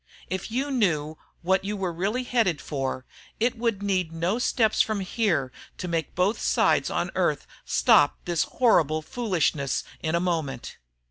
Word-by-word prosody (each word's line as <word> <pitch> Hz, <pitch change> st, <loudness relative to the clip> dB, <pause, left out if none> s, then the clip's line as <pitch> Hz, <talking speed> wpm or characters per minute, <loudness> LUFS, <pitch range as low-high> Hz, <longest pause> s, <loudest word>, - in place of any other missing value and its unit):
If 185 Hz, -1 st, -3 dB
you 265 Hz, +5 st, -2 dB
knew 160 Hz, -, 0 dB, 0.2 s
what 190 Hz, +2 st, +2 dB
you 205 Hz, +1 st, -3 dB
were 185 Hz, -3 st, -2 dB
really 200 Hz, +9 st, -1 dB
headed 225 Hz, -11 st, +1 dB
for, 135 Hz, -3 st, -4 dB, 0.3 s
it 235 Hz, +2 st, +1 dB
would 230 Hz, -4 st, -1 dB
need 185 Hz, -4 st, 0 dB
no 170 Hz, +7 st, -1 dB
steps 225 Hz, -3 st, +2 dB
from 215 Hz, -2 st, 0 dB
here 185 Hz, -, 0 dB, 0.3 s
to 180 Hz, -, -5 dB
make 165 Hz, -2 st, -2 dB
both 185 Hz, +5 st, +1 dB
sides -, -, +2 dB
on -, -, -2 dB
Earth -, -, 0 dB, 0.2 s
stop -, -, +4 dB
this 175 Hz, -3 st, +1 dB
horrible 155 Hz, -, +2 dB
foolishness 170 Hz, -, -1 dB, 0.2 s
in 160 Hz, +1 st, -1 dB
a -, -, +2 dB
moment. 160 Hz, -8 st, -3 dB
185 Hz, 155 wpm, -26 LUFS, 160-220 Hz, 0.3 s, stop